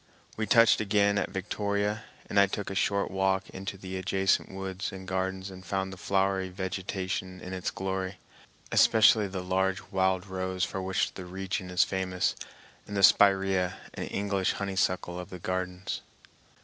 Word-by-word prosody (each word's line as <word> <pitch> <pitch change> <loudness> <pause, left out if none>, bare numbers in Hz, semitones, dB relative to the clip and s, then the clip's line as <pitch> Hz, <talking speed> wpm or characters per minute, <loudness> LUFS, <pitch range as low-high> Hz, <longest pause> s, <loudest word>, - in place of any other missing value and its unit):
We 110 0 -2
touched 115 -1 +6
again 100 -1 +3
at - - -1
Victoria, 100 +2 -2 0.2
and 100 - +2
I 100 - +6
took 100 +1 -4
a - - -3
short 100 +1 +1
walk 95 0 +1
into 95 +1 -6
the 95 0 -6
adjacent 95 +1 +1
woods 95 0 -4
and 95 -1 -9
gardens 95 +1 -2
and 95 0 -11
found 95 0 -2
the - - -7
flowery 95 +1 0
vegetation 95 0 -3
in 90 - -7
its 95 -1 -2
glory, 95 0 -3 0.5
especially 110 -1 +6
the 95 -1 -5
large 95 0 +1
wild 95 -1 +1
rose 95 -1 -2
for 95 - -2
which 95 0 0
the 95 - -8
region 95 +1 -4
is 90 -1 +4
famous, 95 -1 -1 0.5
and 105 - -4
the - - +2
spiræa 95 -1 +5 0.2
and - - -5
English 100 -2 0
honeysuckle 95 -2 -1
of 90 - -7
the 90 - -7
gardens. 90 +1 -3
95 Hz, 160 wpm, -29 LUFS, 95-100 Hz, 0.5 s, touched